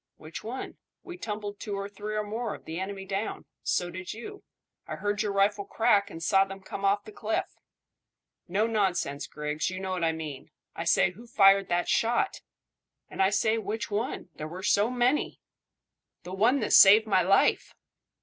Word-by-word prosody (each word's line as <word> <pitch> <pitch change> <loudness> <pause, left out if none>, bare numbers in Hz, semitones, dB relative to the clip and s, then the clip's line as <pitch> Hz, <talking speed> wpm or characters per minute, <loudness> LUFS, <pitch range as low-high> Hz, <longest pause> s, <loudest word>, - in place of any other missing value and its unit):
"Which 155 +1 -9
one? 245 +4 -6 0.3
We 355 - -8
tumbled 205 - -5
two 205 -2 -4
or 200 0 -4
three, 205 +1 -6
or 210 - 0
more, 220 +2 -4
of - - -16
the 160 +2 -5
enemy 195 0 -5
down. 195 +2 -4 0.2
So 175 0 -1
did 185 +1 -6
you. 400 - -9 0.4
I - - -4
heard 205 0 -1
your 210 -2 -1
rifle 200 +1 +2
crack, 200 0 +2
and 165 -3 -8
saw 195 +4 +4
them 195 0 -8
come 195 - -7
off 200 +1 +2
the 215 - -10
cliff." 220 +1 -2 1.0
"No 195 +5 +1
nonsense, 190 -10 -1
Griggs; 150 +1 -3
you 185 0 -5
know 190 0 -4
what 180 -2 -2
I 165 - +3
mean. 155 -4 -7 0.3
I - - -4
say, - - +3
who 230 +6 -14
fired 195 -3 +5
that 175 0 0
shot?" 240 - +1 0.7
"And - - -3
I 190 - +5
say 220 +2 +1
which 220 +1 -4
one? 210 -2 -3
There 155 - -6
were 180 +4 -8
so 210 +2 +3
many." 250 +3 0 0.8
"The 180 +1 -8
one 235 +8 +3
that 210 - 0
saved 210 +3 +8
my 195 -4 +3
life." 190 +3 +2
200 Hz, 190 wpm, -28 LUFS, 185-220 Hz, 1.0 s, saved